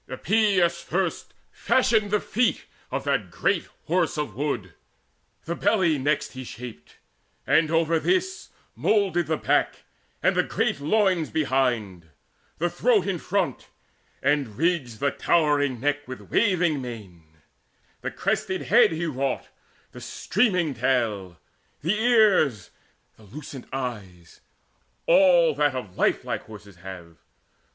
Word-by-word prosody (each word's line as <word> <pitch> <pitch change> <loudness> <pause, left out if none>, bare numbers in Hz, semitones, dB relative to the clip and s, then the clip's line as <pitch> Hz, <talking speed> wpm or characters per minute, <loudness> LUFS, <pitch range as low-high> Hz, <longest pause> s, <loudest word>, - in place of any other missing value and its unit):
Epeius 180 - +1
first 180 0 -2 0.2
Fashioned 220 -5 +2
the 210 +1 +2
feet 240 +4 0 0.2
of - - -3
that - - -1
great - - 0 0.2
Horse 170 -1 0
of 150 -8 -3
Wood: 120 - -3 0.7
The 170 - -2
belly 185 -6 +2
next 145 +2 0
he 130 0 -8
shaped, 115 -9 -10 0.5
and 155 -1 +3
over 165 0 +2
this 375 - -1 0.3
Moulded 190 -6 +1
the 160 0 0
back - - 0 0.4
and - - +3
the - - +4
great - - -1
loins 180 +1 +1
behind, 120 - -1 0.5
The 175 - 0
throat 200 +3 +2
in 190 -4 -2
front, 180 -8 -2 0.6
and 135 -6 0
ridged 145 -8 -1
the 140 0 +2
towering 145 -6 +1
neck 145 +2 -1
With 130 0 -10
waving 175 -9 +2
mane: 90 -10 -10 0.6
the - - -3
crested 190 - -2
head 235 -1 +5
he 165 +2 -2
wrought, 135 -4 -2 0.4
The - - -11
streaming 180 - 0
tail, 115 -8 -1 0.4
the 170 +6 +1
ears, 210 - +3 0.5
the 110 - -18
lucent 135 +4 -10
eyes 105 -10 -6 0.6
All 175 -3 +5
that 145 -2 +1
of 105 -8 -6
lifelike - - 0
horses 105 -3 -13
have. 90 -2 -10
150 Hz, 125 wpm, -25 LUFS, 120-180 Hz, 0.7 s, head